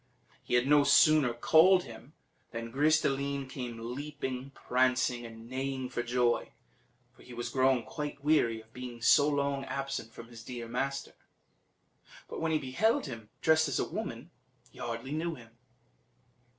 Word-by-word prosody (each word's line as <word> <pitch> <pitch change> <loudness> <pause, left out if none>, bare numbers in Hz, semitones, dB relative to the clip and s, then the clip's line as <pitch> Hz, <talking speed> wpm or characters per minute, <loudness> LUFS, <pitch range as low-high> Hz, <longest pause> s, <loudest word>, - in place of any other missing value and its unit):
He - - -1
had 125 +1 +3
no 145 +1 +5
sooner 140 -1 +5
called 165 +10 +5
him 120 +3 -12 0.4
than 115 0 -6
Gris 150 +5 +3
de - - +1
line 140 0 -2
came 125 -3 -6 0.2
leaping, 135 -2 -5
prancing, 125 -2 0
and 115 0 -12
neighing 130 0 -3
for - - -2
joy, 120 0 0 0.6
for - - -19
he 125 - -12
was 120 - -4
grown 130 -2 +2
quite 145 -2 -6
weary 130 -7 +2
of 110 0 -24
being 125 -2 -8
so 145 +5 +6
long 140 -1 0
absent 135 -5 -4
from 115 0 -11
his 115 -2 -11
dear 120 -1 -7
master; 135 +3 -3 1.1
but - - -6
when 165 0 0
he 155 - +3
beheld 150 - +1
him 115 -6 -8
dressed 160 0 +4
as 140 - -1
a - - 0
woman - - -6 0.4
he - - -17
hardly 115 +3 -5
knew 160 +2 -2
him. 115 -3 -16
130 Hz, 165 wpm, -31 LUFS, 120-145 Hz, 1.1 s, so